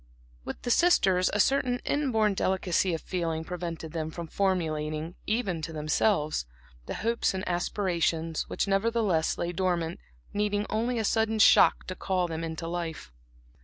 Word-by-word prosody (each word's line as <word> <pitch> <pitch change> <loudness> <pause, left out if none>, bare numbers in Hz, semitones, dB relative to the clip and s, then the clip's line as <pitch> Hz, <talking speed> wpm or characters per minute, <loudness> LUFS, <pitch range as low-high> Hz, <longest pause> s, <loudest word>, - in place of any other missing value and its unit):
With - - -7
the 245 - 0
sisters 195 - +4
a 210 - -1
certain 250 +1 +2
inborn 225 -8 +1
delicacy 185 -2 +1
of 160 - -6
feeling 165 -3 -2
prevented 165 -2 -5
them 160 -1 -3
from 170 +1 -6
formulating, 160 -3 -1
even 210 -7 -1
to 165 - -5
themselves, 155 - +1 0.4
those - - -4
hopes 230 -4 +1
and 190 +1 -4
aspirations 170 -3 -1
which, - - -1
nevertheless, 195 -4 +1
lay 170 - -2
dormant, 175 -2 -1 0.3
needing 205 0 0
only 235 +3 0
a 220 - 0
sudden 220 +1 +1
shock 215 - +6
to 185 - -4
call 185 -1 -1
them 165 0 -4
into 165 0 -4
life. 165 - -5
180 Hz, 150 wpm, -28 LUFS, 165-210 Hz, 0.4 s, shock